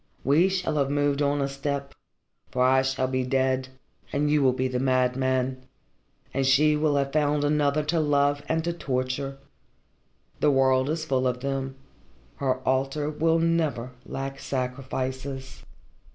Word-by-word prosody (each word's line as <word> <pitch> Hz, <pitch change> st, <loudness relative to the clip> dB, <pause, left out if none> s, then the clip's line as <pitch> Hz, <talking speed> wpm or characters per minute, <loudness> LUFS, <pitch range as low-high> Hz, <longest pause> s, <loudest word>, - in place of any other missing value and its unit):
We 155 Hz, +8 st, +4 dB
shall 185 Hz, -5 st, -1 dB
have 140 Hz, -2 st, +1 dB
moved 145 Hz, 0 st, +1 dB
on 145 Hz, 0 st, +1 dB
a -, -, 0 dB
step, 140 Hz, 0 st, -4 dB, 0.6 s
for 125 Hz, -, +1 dB
I 130 Hz, +1 st, +5 dB
shall 135 Hz, -1 st, 0 dB
be 130 Hz, 0 st, -1 dB
dead 130 Hz, 0 st, 0 dB, 0.4 s
and 145 Hz, +1 st, +1 dB
you 150 Hz, -1 st, +3 dB
will 130 Hz, -2 st, +4 dB
be 130 Hz, +1 st, -1 dB
the 125 Hz, -1 st, -2 dB
madman, 130 Hz, 0 st, +1 dB, 0.7 s
and 135 Hz, -, 0 dB
she 145 Hz, +3 st, +4 dB
will 150 Hz, -1 st, +1 dB
have 140 Hz, -1 st, 0 dB
found 150 Hz, -1 st, +2 dB
another 145 Hz, 0 st, +2 dB
to 160 Hz, +3 st, 0 dB
love 145 Hz, -1 st, +2 dB
and 160 Hz, 0 st, +1 dB
to 170 Hz, +1 st, -1 dB
torture. 135 Hz, -2 st, -3 dB, 1.0 s
The -, -, +3 dB
world 130 Hz, -1 st, +3 dB
is 155 Hz, 0 st, -2 dB
full 130 Hz, -3 st, +1 dB
of 125 Hz, 0 st, -2 dB
them. 135 Hz, -1 st, -3 dB, 0.6 s
Her 130 Hz, -2 st, -1 dB
altar 135 Hz, +3 st, 0 dB
will 160 Hz, +2 st, +2 dB
never 160 Hz, -7 st, 0 dB
lack 135 Hz, 0 st, -5 dB
sacrifices." 130 Hz, +1 st, -4 dB
135 Hz, 150 wpm, -26 LUFS, 130-145 Hz, 1.0 s, I